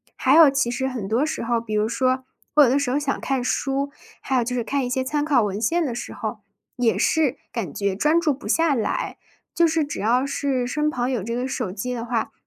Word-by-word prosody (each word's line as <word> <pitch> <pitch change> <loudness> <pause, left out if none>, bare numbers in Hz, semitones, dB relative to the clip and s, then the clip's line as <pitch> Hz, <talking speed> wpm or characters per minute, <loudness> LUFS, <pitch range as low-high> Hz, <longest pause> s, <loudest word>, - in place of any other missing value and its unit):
还 - - +3
有 320 -2 +9
其 270 -3 0
实 265 +2 -1
很 240 -7 -4
多 230 +7 +1
时 310 - -2
候， 230 0 0
比 215 -2 -4
如 210 +1 +2
说 255 +3 0 0.3
我 300 - +8
有 260 - +4
的 275 +3 +3
时 275 -3 -1
候 265 - +1
想 285 -2 -2
看 270 -2 -1
书， 275 +2 -1 0.3
还 265 - -2
有 250 - +3
就 250 +2 -3
是 240 - -1
看 275 +4 -1
一 245 - -2
些 260 +1 0
参 295 +2 -1
考 280 -6 +3
文 205 0 -2
献 335 +9 +1
的 255 - -2
时 235 - -6
候， - - -5 0.4
也 245 -3 +1
是 300 -4 +2
感 220 -10 -4
觉 200 +3 -1
专 300 - +3
注 315 -3 +1
不 270 - -10
下 325 -2 +3
来。 230 -5 -2 0.4
就 340 -1 +4
是 320 0 +1
只 290 - -6
要 245 +5 +2
是 275 -3 -1
身 300 +4 0
旁 250 -3 -1
有 245 -5 -1
这 230 +5 -3
个 250 +2 -2
手 215 -7 -3
机 215 +6 -4
的 235 -2 -4
话， 230 -2 -2
255 Hz, 270 characters per minute, -23 LUFS, 235-285 Hz, 0.4 s, 有